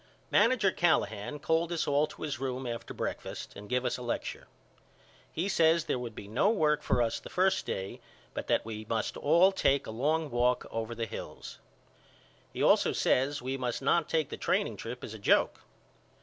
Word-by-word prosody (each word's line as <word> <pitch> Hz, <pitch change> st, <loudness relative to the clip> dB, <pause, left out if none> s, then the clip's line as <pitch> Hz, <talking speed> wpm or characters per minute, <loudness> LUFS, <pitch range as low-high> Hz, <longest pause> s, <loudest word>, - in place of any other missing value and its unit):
Manager 220 Hz, -7 st, +4 dB
Callahan 150 Hz, -, +1 dB
called 160 Hz, +3 st, 0 dB
us 170 Hz, -, -1 dB
all 145 Hz, +1 st, +3 dB
to -, -, -10 dB
his 145 Hz, -5 st, -3 dB
room 130 Hz, -1 st, -3 dB
after 115 Hz, -1 st, -5 dB
breakfast -, -, -5 dB
and 105 Hz, 0 st, -10 dB
give 125 Hz, 0 st, 0 dB
us 125 Hz, -, -1 dB
a -, -, -8 dB
lecture. 120 Hz, -1 st, -4 dB, 0.8 s
He 170 Hz, +4 st, -2 dB
says 165 Hz, -3 st, +3 dB
there -, -, -1 dB
would 120 Hz, -3 st, -6 dB
be 100 Hz, -, -8 dB
no 120 Hz, -, +2 dB
work 155 Hz, -9 st, +2 dB
for 120 Hz, -, +2 dB
us 115 Hz, -, -1 dB
the -, -, -11 dB
first 190 Hz, +1 st, +1 dB
day 95 Hz, 0 st, -4 dB, 0.3 s
but -, -, -5 dB
that -, -, +2 dB
we 110 Hz, -1 st, -6 dB
must 110 Hz, -2 st, -1 dB
all 170 Hz, +6 st, +5 dB
take 140 Hz, -7 st, +2 dB
a -, -, -6 dB
long 150 Hz, +6 st, 0 dB
walk 125 Hz, +1 st, +2 dB
over 115 Hz, +1 st, -3 dB
the 115 Hz, 0 st, -2 dB
hills. -, -, -8 dB, 0.9 s
He -, -, -2 dB
also -, -, +4 dB
says 135 Hz, +1 st, +1 dB
we 130 Hz, +1 st, -2 dB
must 125 Hz, 0 st, -3 dB
not 170 Hz, +5 st, +2 dB
take 160 Hz, -3 st, +1 dB
the -, -, -6 dB
training -, -, 0 dB
trip 125 Hz, +2 st, -7 dB
as 110 Hz, -, -6 dB
a 110 Hz, -, -8 dB
joke. 100 Hz, -, +3 dB
135 Hz, 190 wpm, -30 LUFS, 115-160 Hz, 0.9 s, all